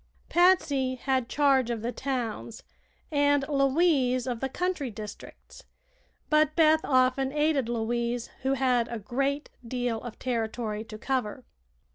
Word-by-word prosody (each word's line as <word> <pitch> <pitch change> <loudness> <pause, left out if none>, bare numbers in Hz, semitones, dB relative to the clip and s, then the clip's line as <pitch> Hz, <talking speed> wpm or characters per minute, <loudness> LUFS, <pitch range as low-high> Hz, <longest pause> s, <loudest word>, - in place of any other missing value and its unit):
Patsy 295 -8 +3
had 260 -1 -1
charge 275 -4 +3
of 230 -2 -3
the 240 - -1
towns 240 -4 -4 0.5
and 285 -1 +3
Louise 275 -3 +2
of 245 -3 -3
the 270 - -2
country 355 -3 -2
districts, 210 -1 -10 0.6
but 305 0 +3
Beth 315 -1 +5
often 260 0 +2
aided 295 -4 +1
Louise, 235 +1 -2
who 265 +1 +1
had 250 -3 +2
a 235 - -5
great 275 +7 -2
deal 245 -1 -2
of 240 -3 -8
territory 225 -3 -3
to 215 -1 -9
cover. 250 0 -2
255 Hz, 130 wpm, -27 LUFS, 235-280 Hz, 0.6 s, Beth